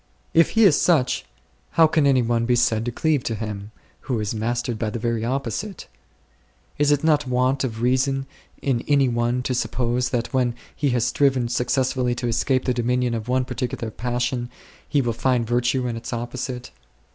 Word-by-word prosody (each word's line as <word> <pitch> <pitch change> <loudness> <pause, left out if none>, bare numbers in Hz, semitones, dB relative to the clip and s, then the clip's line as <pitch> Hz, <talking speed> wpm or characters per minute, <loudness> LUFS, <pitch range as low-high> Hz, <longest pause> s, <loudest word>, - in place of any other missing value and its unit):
If 165 0 +5
He 225 - +7
is 180 -8 +5
such, 130 -8 +2 0.5
how 165 - +8
can 155 -2 +3
any 130 -3 +4
one 115 0 0
be 125 - +3
said 115 -2 +2
to 120 - -1
cleave 150 +3 +1
to 115 - -1
Him, 105 -2 -5 0.4
who 125 -5 -1
is 105 0 -2
mastered 120 +1 -2
by 110 - -1
the 110 - -4
very 115 -1 -1
opposite? 135 - -3 0.9
Is 145 0 +3
it 145 0 +2
not 150 -3 +3
want 125 +2 +1
of 115 -3 -3
reason 135 +2 +1 0.4
in 130 -4 0
any 140 -2 +4
one 120 +1 0
to 130 - -1
suppose 125 0 0
that 120 0 -2
when 125 -2 +1 0.2
he 145 - 0
has 120 -2 +1
striven 130 -2 +2
successfully 125 0 0
to 120 0 -3
escape 130 +3 +1
the 125 - +2
dominion 125 0 0
of 115 -1 -4
one 130 0 +1
particular 125 -2 -4
passion, 120 +1 -2 0.4
he 140 -2 +2
will 120 -1 0
find 125 0 +1
virtue 120 +2 +1
in 120 -2 -2
its 115 - -6
opposite 125 +1 -5
125 Hz, 185 wpm, -23 LUFS, 120-130 Hz, 0.9 s, how